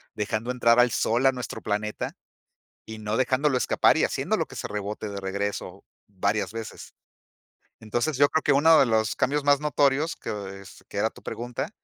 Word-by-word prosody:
dejando 110 +2 -2
entrar 120 -1 +3
al 120 0 +5
sol 120 +3 +1
a 135 - +5
nuestro 125 -1 -6
planeta, 105 0 -3 0.7
y 110 0 -8
no 105 +1 -2
dejándolo 130 +2 +2
escapar, - - +3
y - - +2
haciéndolo - - 0
que - - -13
se - - -4
rebote 105 +1 -5
de 100 - -5
regreso 100 +1 -4 0.2
varias 100 +2 -1
veces. 115 -1 -8 0.9
Entonces, 120 +6 -2
yo 145 - +6
creo 160 +2 0
que 145 - +3
uno 160 +4 +6
de 135 - +6
los 110 -1 +1
cambios 145 +1 0
más 145 0 +4
notorios, 145 +1 +1
que 100 -2 -6
es, 95 - -14
que - - -7
era - - +2
tu - - -17
pregunta, 120 0 -5
115 Hz, 180 wpm, -26 LUFS, 105-135 Hz, 0.9 s, yo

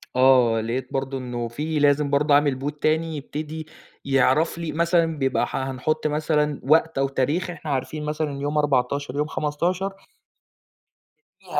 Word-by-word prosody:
آه، 125 -3 +5
لقيت 125 +3 -4
برضه 135 0 -2
إنه 120 -2 -4
في 150 +6 -3
لازم 145 0 +3
برضه 145 +1 +2
أعمل 145 -2 +3
Bot 145 +2 -4
تاني 160 0 +1
يبتدي 155 +2 -6 0.4
يعرف 135 +4 +2
لي 170 -2 -4
مثلًا 170 +1 +2
بيبقى 135 -2 +1
ح - - -4
حنحُط 145 +4 -1
مثلًا 150 -1 0
وقت 160 +3 +3
أو 135 0 +2
تاريخ، 145 +7 -1
إحنا 160 -3 -6
عارفين 150 +3 -3
مثلًا 150 0 -2
إن 140 0 -6
يوم 145 +1 -1
14 140 -1 0
يوم 150 +1 0
15 175 +6 -1 1.5
فيه - - -3
145 Hz, 155 wpm, -23 LUFS, 135-155 Hz, 1.5 s, آه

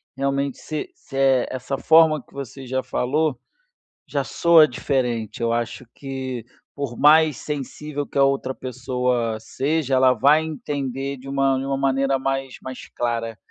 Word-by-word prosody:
realmente 140 0 -1
se 155 - -5
se 140 - -10
é 135 -2 +4
essa 130 +1 -3
forma 160 -1 +5
que - - -25
você 135 -1 -7
já 130 +1 -1
falou, 145 +3 0 0.7
já - - -1
soa 165 -2 +5
diferente. 120 -4 -2
Eu 115 0 +1
acho 120 0 -2
que 130 -3 -5 0.3
por 140 -4 -4
mais 155 0 +5
sensível 145 0 -5
que - - -15
a 140 - +5
outra 135 -1 +1
pessoa 125 -3 -1
seja, 140 +4 -1
ela 130 0 +5
vai 145 +6 +4
entender 140 -3 -4
de 135 +1 -12
uma 135 -1 +2
de 135 - -3
uma 135 0 -1
maneira 135 0 +1
mais 135 -1 -2
mais 130 -1 -8
clara. 115 -2 -2
135 Hz, 155 wpm, -23 LUFS, 125-140 Hz, 0.7 s, forma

